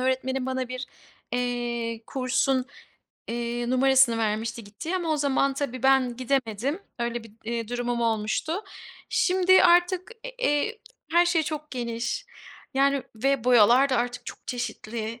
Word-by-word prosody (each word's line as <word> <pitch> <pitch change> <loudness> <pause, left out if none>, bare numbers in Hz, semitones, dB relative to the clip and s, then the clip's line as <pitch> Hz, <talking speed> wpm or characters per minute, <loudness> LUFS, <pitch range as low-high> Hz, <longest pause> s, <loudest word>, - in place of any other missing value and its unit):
öğretmenim 260 0 0
bana 260 -1 -2
bir, 255 +1 -5 0.5
eee, 240 -2 -2
kursun, 260 0 +1 0.6
eee, 240 +1 -2
numarasını 260 -2 +4
vermişti 225 +1 -2
gittiği 215 - -4
ama 345 -3 -3
o 310 - +1
zaman 275 -1 +1
tabii 255 -3 -4
ben 265 -3 +3
gidemedim, 260 - -1 0.2
öyle 235 -1 -2
bir, 225 - -14
eee, 230 -1 -3
durumum 245 0 -2
olmuştu. 225 +6 0 0.6
Şimdi 375 -5 +4
artık, 355 +3 +4 0.3
eee, 435 +3 +1 0.3
her 345 +1 +5
şey 345 -2 +2
çok 305 0 -5
geniş. 240 - -3 0.5
Yani 275 -1 +3
ve 270 0 +1
boyalar 245 +3 +6
da 255 - +1
artık 245 +1 -2
çok - - -7
çeşitli, 230 -1 -4
255 Hz, 135 wpm, -26 LUFS, 235-280 Hz, 0.6 s, boyalar